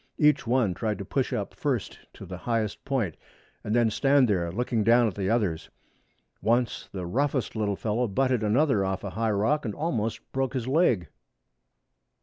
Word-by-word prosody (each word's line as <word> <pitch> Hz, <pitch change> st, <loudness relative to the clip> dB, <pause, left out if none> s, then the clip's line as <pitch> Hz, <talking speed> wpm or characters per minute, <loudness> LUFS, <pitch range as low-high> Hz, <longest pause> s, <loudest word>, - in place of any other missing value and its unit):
Each 150 Hz, -5 st, +3 dB
one 120 Hz, -6 st, +2 dB
tried 105 Hz, +2 st, -2 dB
to -, -, -6 dB
push -, -, -1 dB
up -, -, -3 dB
first -, -, -2 dB, 0.2 s
to -, -, -10 dB
the 90 Hz, 0 st, -7 dB
highest 110 Hz, -3 st, -1 dB
point, 120 Hz, -, -1 dB, 0.5 s
and 105 Hz, -, -1 dB
then 120 Hz, -2 st, +3 dB
stand 135 Hz, +2 st, +4 dB
there, 90 Hz, -5 st, 0 dB
looking 115 Hz, +2 st, 0 dB
down 120 Hz, +3 st, +5 dB
at 105 Hz, -, -2 dB
the 95 Hz, -1 st, -2 dB
others. 105 Hz, -9 st, 0 dB, 0.7 s
Once 120 Hz, +1 st, 0 dB
the 95 Hz, -2 st, -5 dB
roughest 130 Hz, +5 st, -1 dB
little 105 Hz, -2 st, 0 dB
fellow 115 Hz, +4 st, -1 dB
butted 125 Hz, +3 st, +1 dB
another 110 Hz, 0 st, +2 dB
off 95 Hz, 0 st, -2 dB
a 100 Hz, -, -4 dB
high 115 Hz, +2 st, -1 dB
rock 110 Hz, +9 st, +1 dB
and 105 Hz, -4 st, -4 dB
almost 115 Hz, -9 st, -2 dB
broke 135 Hz, 0 st, -1 dB
his 125 Hz, -2 st, -2 dB
leg. 130 Hz, -, +2 dB
115 Hz, 175 wpm, -27 LUFS, 100-130 Hz, 0.7 s, down